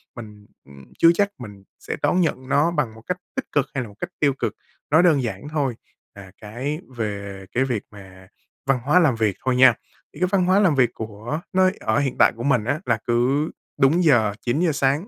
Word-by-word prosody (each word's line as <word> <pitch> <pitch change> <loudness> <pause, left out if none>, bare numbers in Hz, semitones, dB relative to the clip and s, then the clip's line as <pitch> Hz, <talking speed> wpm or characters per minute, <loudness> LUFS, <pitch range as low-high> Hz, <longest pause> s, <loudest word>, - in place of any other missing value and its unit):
mình, 105 -3 -11 0.2
ừm, 70 -1 -15
chưa 165 - +7
chắc 200 +3 +1
mình 105 -5 -11 0.2
sẽ - - -5
đón 180 - +2
nhận 130 -6 -1
nó 155 +4 +3
bằng 140 -9 -1
một 110 - -14
cách 180 0 -1 0.2
tích 270 - -3
cực 145 -2 +2
hay 130 - -1
là - - -8
một 100 - -16
cách - - -4
tiêu 140 -3 +3
cực. - - -1 0.4
Nói 160 +4 +5
đơn 150 -7 +4
giản 110 +4 -5
thôi 140 -6 -1 0.4
là 95 -2 -12
cái 130 +9 -4 0.2
về 100 -3 -5
cái 130 - +1
việc 120 -6 -2
mà 95 -2 -14 0.4
văn 135 -2 +2
hóa 150 +6 +4
làm 145 -8 +3
việc 110 -4 0
thôi 130 -1 +2
nha, 130 -2 +7 0.4
thì 145 - -12
cái 180 - +2
văn 185 -2 +2
hóa 190 +2 +4
làm 180 -8 +3
việc 125 -3 +3
của 110 +8 -6
nơi 185 0 +3
ở 110 +5 0
hiện 135 -3 -1
tại - - +6
của 115 - -7
mình 125 -6 +2
á, 145 +4 -1
là - - +1
cứ 130 +6 +1 0.3
đúng 155 +7 +4
giờ 115 -10 +4
9:00 155 +7 +1
sáng 145 +6 0
130 Hz, 225 wpm, -22 LUFS, 110-155 Hz, 0.4 s, chưa